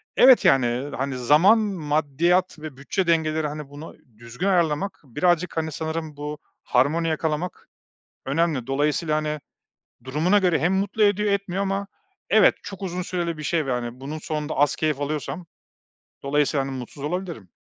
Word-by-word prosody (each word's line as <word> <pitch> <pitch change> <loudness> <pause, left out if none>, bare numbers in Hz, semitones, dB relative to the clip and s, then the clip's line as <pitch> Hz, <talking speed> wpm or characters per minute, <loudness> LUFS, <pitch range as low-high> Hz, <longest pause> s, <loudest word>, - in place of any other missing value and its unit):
evet, 255 -1 +7
yani, 130 +1 +2
hani, 135 0 -2
zaman, 155 - +5
maddiyat 170 -1 0
ve 155 -4 -8
bütçe 170 +6 -2
dengeleri, 160 -2 +1
hani, 150 -1 -7
bunu 145 +3 -10 0.2
düzgün 120 +11 -4
ayarlamak 175 +1 +1
birazcık, 170 +6 0
hani, 160 -1 -1
sanırım 160 -1 -4
bu 150 +1 -5 0.3
harmoni 150 +7 +2
yakalamak 160 +2 -3 0.6
önemli 145 -3 0
dolayısıyla, 150 +3 0
hani, 155 0 -2 0.6
durumuna 155 +10 +2
göre 180 -4 +2
hem 180 +3 +1
mutlu 200 +3 0
ediyor 205 0 +3
etmiyor 200 -1 -1
ama 195 0 -2 0.4
evet - - +6
çok 195 -1 -9
uzun 180 -1 -3
süreli 170 -3 -3
bir - - -6
şey, 160 0 0
ve, 130 - -2
hani, 120 -1 -2
ve 120 +2 -9
bunun 150 +4 -5
sonunda 150 0 -4
az 145 0 +2
keyif 155 -3 -1
alıyorsam 155 +4 -4 0.8
dolayısıyla, 140 0 +1
hani, 135 - -5
mutsuz 130 +3 -9
olabilirim. 170 - -4
155 Hz, 155 wpm, -24 LUFS, 145-180 Hz, 0.8 s, evet